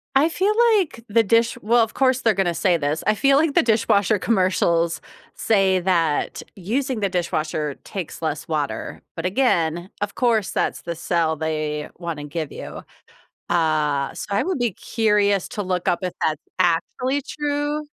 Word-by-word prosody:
I 280 +4 +5
feel 385 +5 +1 0.2
like 315 - -2
the 225 +2 +3
dish 230 +2 +2
Well, 230 +2 +4
of 220 - -4
course 260 -1 +2
they're 225 - +3
gonna 190 -3 0
say 175 +1 +2
this, 150 0 -2
I 215 - +3
feel 275 +5 +4
like 305 0 +2
the - - +5
dishwasher 215 -2 +2
commercials 175 -5 +1 0.3
say 195 -3 +2
that 170 -5 0
using 240 +6 -2
the 200 -2 0
dishwasher 155 -4 -2
takes 185 -5 -6
less 155 -2 -3
water, 150 -3 -3
but 165 - -5
again, 175 -6 +1
of 205 -1 -3
course, 230 -5 +1
that's - - -1
the 170 0 -5
sell 165 -1 0
they 155 -1 -3
wanna 165 -4 -5
give 155 0 -4
you, - - -8 0.7
uh, 155 -4 +1
so - - -6
I 200 - +2
would 360 -2 -2
be 240 -2 +1
curious 205 -3 +1
to 205 - -4
look 180 -2 -2
up 175 - +2
if 180 - -2
that's 155 -1 0 0.2
actually 250 +10 +1
true, 295 +1 -2
190 Hz, 165 wpm, -22 LUFS, 165-230 Hz, 0.7 s, I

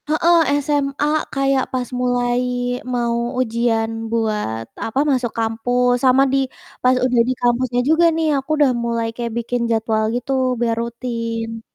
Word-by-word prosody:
Heeh, 335 +3 +4 0.3
SMA 285 -1 0 0.3
kayak 275 -1 +1
pas 250 -1 -1
mulai 245 -1 +1 0.5
mau 235 -1 0 0.2
ujian 230 -2 0 0.2
buat, 210 - -1 0.2
apa, 225 +4 -2
masuk 255 -3 0
kampus, 245 +2 +1
sama 260 0 +5
di - - +4 0.5
pas 255 +1 +4
udah 250 -2 +3
di - - +2
kampusnya 245 0 +1
juga 325 +2 +4
nih, 325 -1 0
aku 270 +2 -5
udah 290 -3 +4
mulai 230 -1 -1
kayak 235 -1 -4
bikin 235 +1 -2
jadwal 220 -1 +1
gitu, 250 +3 -3 0.3
biar 230 -1 +2
rutin. 230 -1 -4
245 Hz, 145 wpm, -20 LUFS, 230-260 Hz, 0.5 s, sama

